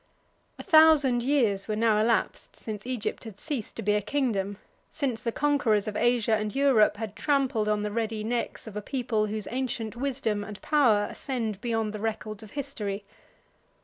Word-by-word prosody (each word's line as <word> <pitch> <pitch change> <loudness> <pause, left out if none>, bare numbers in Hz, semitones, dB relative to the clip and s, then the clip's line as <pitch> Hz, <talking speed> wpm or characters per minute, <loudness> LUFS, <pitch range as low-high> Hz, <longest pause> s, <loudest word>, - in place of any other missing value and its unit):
A - - -8
thousand 310 -6 +6
years 235 -7 +1
were 215 - -1
now 220 -1 +3
elapsed 225 +2 0
since 215 +1 -7
Egypt 250 -4 -3
had 215 -3 -10
ceased 275 -9 -4
to 225 - -5
be 210 +1 +2
a 210 - +2
kingdom, 205 -6 -1 0.3
since 255 -7 -2
the 230 - -1
conquerors 235 -7 +1
of 210 - -3
Asia 240 -1 +2
and 215 +1 -3
Europe 265 -7 +4
had 220 -2 -5
trampled 270 -7 +1
on 210 0 +1
the 210 - -2
ready 220 -1 -2
necks 235 +2 -3
of 220 -2 -9
a 210 - -3
people, 230 -3 -1
whose 215 0 -4
ancient 240 -3 -3
wisdom 245 -5 -1
and 205 0 -8
power 235 -9 +3
ascend 225 -7 -4
beyond 225 -3 -1
the 210 - -5
records 215 -1 -4
of 215 -2 -12
history. 210 -8 -4
225 Hz, 180 wpm, -27 LUFS, 210-255 Hz, 0.3 s, thousand